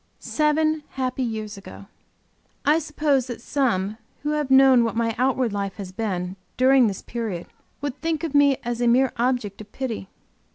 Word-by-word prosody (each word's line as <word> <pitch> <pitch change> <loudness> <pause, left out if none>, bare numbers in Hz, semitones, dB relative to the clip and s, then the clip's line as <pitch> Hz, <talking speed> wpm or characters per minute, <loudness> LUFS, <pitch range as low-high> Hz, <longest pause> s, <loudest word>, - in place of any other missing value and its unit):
Seven 310 0 +1
happy 260 0 -2
years 220 -3 -3
ago! 195 - -11 0.8
I 300 +3 +4
suppose 295 -4 0
that 240 -2 -6
some 220 -6 0 0.3
who 295 - 0
have 300 -2 -1
known 265 -2 +7
what 230 - -1
my 230 0 +1
outward 255 -3 +1
life 200 -1 -3
has 195 -3 -7
been 185 -3 -3 0.2
during 260 -1 +5
this 195 -3 -4
period 220 -7 -4 0.4
would 285 -1 -4
think 325 -1 -1
of 320 -3 -3
me 285 -2 +5
as 240 0 -3
a 240 - +3
mere 255 +2 +4
object 235 -5 -1
of 210 -1 -13
pity. 230 -7 -4
250 Hz, 170 wpm, -24 LUFS, 215-280 Hz, 0.8 s, known